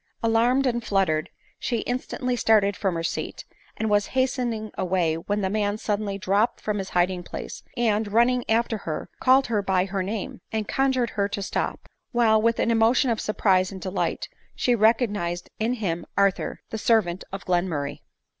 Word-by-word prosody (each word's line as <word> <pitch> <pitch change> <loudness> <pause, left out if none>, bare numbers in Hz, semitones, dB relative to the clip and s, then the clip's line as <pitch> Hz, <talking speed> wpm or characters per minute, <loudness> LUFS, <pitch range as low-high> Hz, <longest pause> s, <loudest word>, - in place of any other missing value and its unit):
Alarmed 235 +4 +3
and 240 -2 0
fluttered, 185 -8 +1 0.3
she 235 -3 -1
instantly 250 0 -2
started 210 -4 +3
from 190 -3 -1
her 165 - -2
seat, - - -4 0.3
and 220 - -1
was 205 -1 +2
hastening 245 -4 0
away, 180 -3 +1
when 200 +6 -2
the 190 - +1
man 205 -1 0
suddenly 205 -2 -2
dropped 200 +4 +1
from 210 -1 -2
his 195 - -4
hiding 180 +1 +2
place, - - -7 0.2
and, 215 -3 +1
running 240 +3 +3
after 225 -1 +1
her, 155 -5 -5
called 265 +1 +5
her 215 -3 0
by 190 -2 +1
her 195 0 -2
name, 220 +6 -4
and 220 -2 -2
conjured 260 -3 +1
her 200 -1 0
to 200 -1 -3
stop; - - -3 0.3
while, 220 -3 +4
with 230 +1 +2
an 230 - +1
emotion 230 +3 +3
of 225 - -1
surprise 190 -3 +2
and 190 - -7
delight, 185 +2 -2 0.3
she 245 - +2
recognised 210 -6 +1
in 225 +3 +1
him 175 -7 -2
Arthur, 200 -1 +1
the 220 - -3
servant 200 -6 +2
of 195 0 -6
Glenmur 175 -5 0
ray 140 - -6
210 Hz, 175 wpm, -25 LUFS, 190-230 Hz, 0.3 s, called